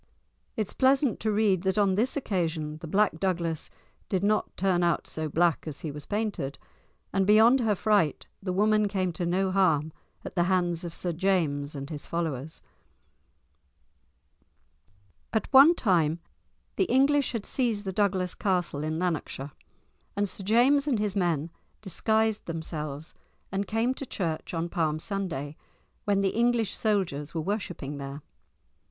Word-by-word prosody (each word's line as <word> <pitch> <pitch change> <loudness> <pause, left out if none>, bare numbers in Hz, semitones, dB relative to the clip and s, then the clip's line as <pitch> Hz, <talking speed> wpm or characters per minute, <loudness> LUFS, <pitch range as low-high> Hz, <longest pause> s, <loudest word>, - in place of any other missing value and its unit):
It 215 - +1
is - - -7
pleasant 265 -2 +3
to 220 - 0
read 205 -4 +2
that 190 +2 0
on 200 -2 +3
this 235 +9 0
occasion 160 - -2
the 165 - -8
Black 195 -1 +2
Douglas 170 -4 -1 0.4
did 190 -1 0
not 215 +1 0
turn 185 -2 +2
out 170 -2 +1
so 155 -1 -3
black 170 +1 +2
as 145 -3 -5
he 155 - -4
was 150 0 -8
painted, 205 -10 -2 0.6
and 195 0 +2
beyond 225 +5 +6
her 220 -4 +2
fright 200 -7 +1 0.2
the 190 -2 -3
woman 210 +2 +3
came 185 -3 -1
to 170 +2 -2
no 190 +2 +1
harm 160 -5 +2 0.3
at - - -6
the 175 -2 +2
hands 175 -2 +1
of 170 -1 -6
Sir 175 -2 -2
James 155 -6 0
and 140 +3 -6
his 150 -2 -6
followers. 160 -3 -3 2.7
At 220 - +1
one 280 +6 +9
time 170 - +2 0.6
the - - +3
English 275 0 +3
had 225 -3 -3
seized 230 -6 -1
the 190 - -3
Douglas 190 -3 +1
castle 175 -7 -1
in 155 +1 -2
Lanarkshire, 160 -5 -3 0.6
and 205 0 +1
Sir 195 - -4
James 255 +8 +4
and 265 -6 +2
his 210 -1 -1
men 170 -4 0 0.3
disguised 220 +3 0
themselves 155 -2 -5 0.4
and 195 +1 -2
came 225 +5 +1
to 270 0 -7
church 165 -8 -3
on 165 +1 -1
Palm 160 -3 0
Sunday, 160 -6 -4 0.5
when 200 -1 +2
the 195 - +2
English 235 -1 +1
soldiers 180 -9 -1
were 160 - 0
worshipping 165 -7 -4
there. 140 +1 -7
185 Hz, 155 wpm, -27 LUFS, 160-210 Hz, 2.7 s, one